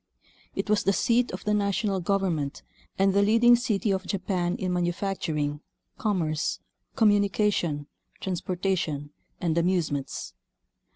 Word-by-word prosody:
It - - -2
was 210 0 +3
the 195 - +3
seat 240 +4 +2
of 185 - -6
the 210 - +2
national 200 -1 +1
government 175 -6 -1 0.3
and 195 0 +3
the 200 - +4
leading 230 +4 +6
city 225 -4 0
of 190 -1 -2
Japan 180 -2 -1
in 185 -1 -2
manufacturing, 175 -5 -1 0.4
commerce, 170 -9 0 0.4
com 220 -5 +5
munication, 200 -7 +1 0.3
transportation, 180 -5 -2 0.3
and 165 -2 0
amusements. 165 -6 -1
190 Hz, 120 wpm, -27 LUFS, 170-205 Hz, 0.4 s, leading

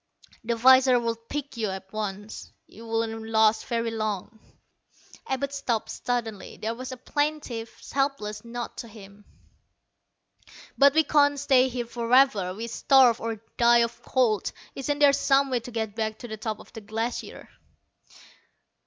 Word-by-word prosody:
"The 235 +1 -1
visors 260 +1 +6
would 230 -1 -4
pick 290 -3 -5
you 220 -2 -1
up 190 -1 -5
at - - -31
once. 210 0 -5
You 230 +1 -13
wouldn't 225 0 -2
last 220 0 +3
very 230 -1 -1
long." 215 -1 -4 0.9
Abud 275 +1 -2
stopped 245 -5 -2
suddenly. 230 -4 -4
There 220 +1 -3
was 255 +2 -7
a 255 - -7
plaintive, 285 -4 -2 0.2
helpless 270 -7 -1
note 240 0 -6
to 235 - -6
him. 205 -2 -14 1.5
"But 280 +1 +5
we 320 - +5
can't 285 -1 +3
stay 265 -2 +4
here 245 -1 -3
forever. 235 -4 +2
We'd 230 +2 -6
starve, 255 -4 +4
or 225 -1 -4
die 235 0 +5
of 235 0 -5
cold. 230 -7 +1 0.2
Isn't 285 +2 -2
there 290 -1 +6
some 275 -1 +2
way 250 - +1
to 235 - -10
get 220 -3 -3
back 220 0 -3
to 240 - -9
the 220 - -5
top 215 0 -4
of - - -16
the 225 - -8
Glacier?" 225 +3 -5
235 Hz, 155 wpm, -26 LUFS, 220-260 Hz, 1.5 s, visors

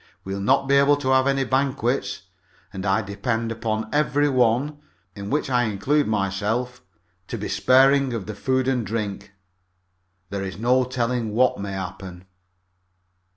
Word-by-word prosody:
We'll 95 +1 -4
not 135 +6 +2
be 140 0 +4
able 140 +1 +5
to 135 -2 -3
have 130 0 +4
any 135 0 +2
banquets, 130 -6 -1 0.5
and 95 0 -4
I 100 +3 +2
depend 110 +3 -2
upon 110 -1 -2
every 145 0 +2
one 130 +3 +1 0.4
in 100 0 -7
which 150 +1 0
I 125 -2 +2
include 115 +9 0
myself 110 +5 -1 0.5
to - - -4
be - - -4
sparing 135 +1 +4
of 115 -5 -4
the 110 - -6
food 130 +4 0
and 130 -3 +1
drink. 100 -2 -4 1.0
There 100 -1 -3
is 95 -1 -6
no 125 +3 +2
telling 125 -2 -1
what 125 -3 +3
may 100 -1 -4
happen." 95 -1 -7
120 Hz, 155 wpm, -23 LUFS, 100-130 Hz, 1.0 s, able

